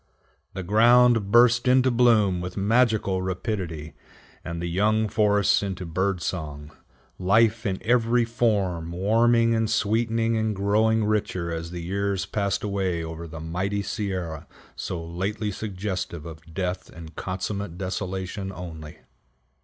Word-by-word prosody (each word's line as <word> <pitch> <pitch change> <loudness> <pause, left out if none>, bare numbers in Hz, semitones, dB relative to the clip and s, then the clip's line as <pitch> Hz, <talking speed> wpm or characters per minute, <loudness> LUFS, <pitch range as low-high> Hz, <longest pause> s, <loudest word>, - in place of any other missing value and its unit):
The 95 - -4
ground 115 +2 +5
burst 120 +2 +5
into 130 0 +4
bloom 110 -7 +3
with 90 +2 -6
magical 105 -2 +2
rapidity, 90 -4 -4 0.5
and 85 0 -5
the 85 - -3
young 105 +5 +1
forests 105 -1 +3
into 95 -2 -4
bird 95 +2 -1
song: 75 -4 -5 0.5
life 110 +4 +3
in 95 -1 -1
every 120 0 +3
form 100 -8 0
warming 115 +5 +3
and 110 -1 +1
sweetening 115 +1 +1
and 110 -1 0
growing 110 +3 +2
richer 95 -5 -1
as 80 0 -4
the 85 -1 -6
years 100 +1 -1
passed 100 -2 -1
away 95 -4 -1
over 80 +1 -6
the 80 0 -8
mighty 95 +6 -2
Sierra 95 -6 -4 0.3
so 90 - -4
lately 100 +5 -3
suggestive 95 -5 -4
of 80 0 -11
death 90 +1 -3
and 80 -2 -11
consummate 95 -1 -4
desolation 95 +1 -4
only. 80 -4 -9
100 Hz, 130 wpm, -25 LUFS, 90-110 Hz, 0.5 s, ground